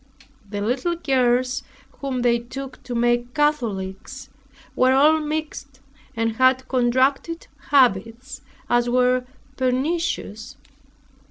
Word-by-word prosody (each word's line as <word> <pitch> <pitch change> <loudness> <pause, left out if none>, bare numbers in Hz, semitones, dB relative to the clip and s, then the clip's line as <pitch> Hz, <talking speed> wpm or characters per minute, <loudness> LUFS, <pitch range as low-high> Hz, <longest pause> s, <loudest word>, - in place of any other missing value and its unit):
The 205 0 -4
little 255 +11 -1
girls, 255 -4 +1 0.4
whom 260 -3 -3
they 235 -1 +3
took 265 +3 -8
to 245 - -5
make 240 +1 0
Catholics, 260 -3 -2 0.5
were 255 +1 +4
all 300 +4 +5
mixed 300 -3 -5 0.4
and 225 0 -1
had 260 0 +3
contracted 260 +6 +1 0.2
habits 240 -1 +2 0.3
as 240 0 +2
were 250 0 +2 0.3
pernicious. 260 -3 -2
255 Hz, 100 wpm, -22 LUFS, 240-275 Hz, 0.5 s, all